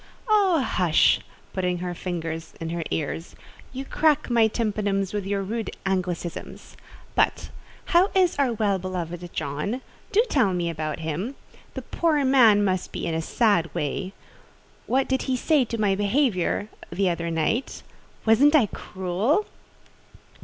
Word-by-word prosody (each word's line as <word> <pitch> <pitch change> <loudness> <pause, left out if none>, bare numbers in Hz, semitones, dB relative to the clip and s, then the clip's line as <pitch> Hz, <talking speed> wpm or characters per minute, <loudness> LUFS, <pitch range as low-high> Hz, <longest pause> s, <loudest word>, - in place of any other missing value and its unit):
"Oh, 395 -7 +4
hush!" 180 -9 +3 0.3
(putting 180 -1 -1
her 180 0 -4
fingers 165 -2 -5
in 165 0 -4
her 170 0 -2
ears) 160 +2 -3 0.4
"you 265 +1 -6
crack 300 -2 +2
my 230 -2 +5
tympanums 205 -3 -1
with 205 -2 -3
your 200 0 -1
rude 220 +3 -4
Anglicisms. 180 -3 -3 0.4
But, - - +1 0.3
how 365 +2 +4
is 365 -5 +3
our 270 -3 +3
well 205 -4 0
beloved 175 -1 -5
John? 155 - -3 0.3
Do 445 +4 +4
tell 235 - +2
me 170 -1 -1
about 155 -1 -4
him. 170 - -3 0.4
The - - -5
poor 310 -4 +1
man 230 -6 +6
must 185 -2 -1
be - - -4
in 165 - -1
a 160 - 0
sad 175 -2 +2
way. 185 +6 -2 0.7
What 265 +1 +2
did 265 0 0
he 260 - +2
say 290 0 +3
to 230 0 -4
my 205 -2 +3
behaviour 205 -1 +1 0.2
the 185 +1 +1
other 170 0 -3
night? 165 - -1 0.4
Wasn't 265 +8 +5
I 275 -7 +6
cruel?" 200 - -1
200 Hz, 145 wpm, -25 LUFS, 175-260 Hz, 0.7 s, man